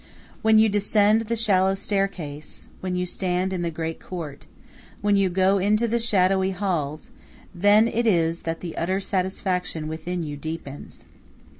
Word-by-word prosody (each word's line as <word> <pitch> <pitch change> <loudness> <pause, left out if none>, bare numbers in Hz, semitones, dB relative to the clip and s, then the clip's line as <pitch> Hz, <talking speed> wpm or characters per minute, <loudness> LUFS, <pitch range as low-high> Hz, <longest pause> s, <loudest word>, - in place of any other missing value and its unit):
When 220 0 +5
you 220 +1 +6
descend 210 +1 +3
the 230 - 0
shallow 195 -4 +2
staircase, 195 -7 -4
when 185 -1 -3
you 180 0 -1
stand 180 +1 -1
in 180 - -2
the 170 - -1
great 165 0 -4
court, 160 -6 -8 0.5
when 205 0 +3
you 195 -1 +3
go 190 +2 +3
into 215 +4 +2
the 235 +1 0
shadowy 190 -4 +2
halls, 175 -6 -3 0.4
then 205 +5 +5
it 235 0 0
is 170 -4 +2
that 165 0 -4
the 170 -3 -6
utter 185 +3 0
satisfaction 185 -4 -2
within 165 +3 -4
you 145 -2 -5
deepens. 145 -2 -8
185 Hz, 155 wpm, -24 LUFS, 165-205 Hz, 0.5 s, you